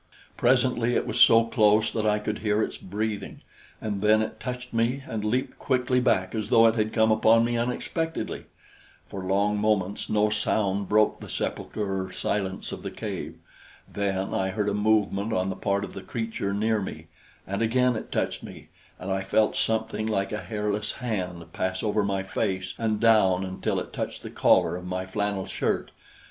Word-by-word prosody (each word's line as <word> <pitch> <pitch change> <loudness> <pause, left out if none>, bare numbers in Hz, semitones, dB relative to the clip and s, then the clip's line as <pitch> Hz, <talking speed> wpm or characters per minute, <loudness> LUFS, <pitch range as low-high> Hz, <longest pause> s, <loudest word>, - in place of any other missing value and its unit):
Presently 120 -1 +2
it - - +1
was - - -2
so 115 0 +8
close 110 -1 +3
that 110 -1 -1
I 105 0 +3
could 105 0 -3
hear 105 0 +1
its - - -3
breathing, 105 +2 -4 0.4
and 105 -3 -3
then 110 +1 +4
it 110 0 -6
touched 125 -1 -6
me 120 +4 0
and 110 -2 -3
leaped 125 +5 -1
quickly 125 -1 +1
back 95 -7 +1
as 110 -2 -3
though 115 - +6
it 115 - +5
had 110 -1 0
come 110 -1 +3
upon 110 +1 +5
me 120 0 -1
unexpectedly. 125 +7 -2 0.6
For 95 - -7
long 100 +2 +1
moments 105 -2 0
no 105 0 +2
sound 100 -2 0
broke 105 0 +3
the - - -10
sepulchral 95 -3 -3
silence 95 0 -3
of - - -6
the - - -4
cave. - - -5 0.5
Then 95 -1 -2
I 95 0 0
heard 105 +1 -1
a - - -1
movement 105 0 +1
on 95 +1 0
the - - -4
part 100 0 0
of - - -7
the - - -7
creature 115 -4 -3
near 110 +1 +1
me, 95 - -6 0.4
and 100 +2 -3
again 125 +2 +2
it 110 - -6
touched - - -1
me, - - -11 0.3
and 95 - -5
I 95 0 0
felt 105 +3 +2
something 110 -1 0
like 100 -3 -1
a 105 0 -3
hairless 105 -1 -2
hand 90 -8 -4
pass 95 0 -2
over 105 -1 +1
my 100 -1 -1
face 95 -2 -2
and 110 -2 0
down 100 -5 +4
until 95 0 -2
it - - -7
touched - - -4
the - - -7
collar - - +3
of 90 - -6
my 95 +1 -3
flannel 100 -1 -2
shirt. - - -2
105 Hz, 185 wpm, -26 LUFS, 95-115 Hz, 0.6 s, so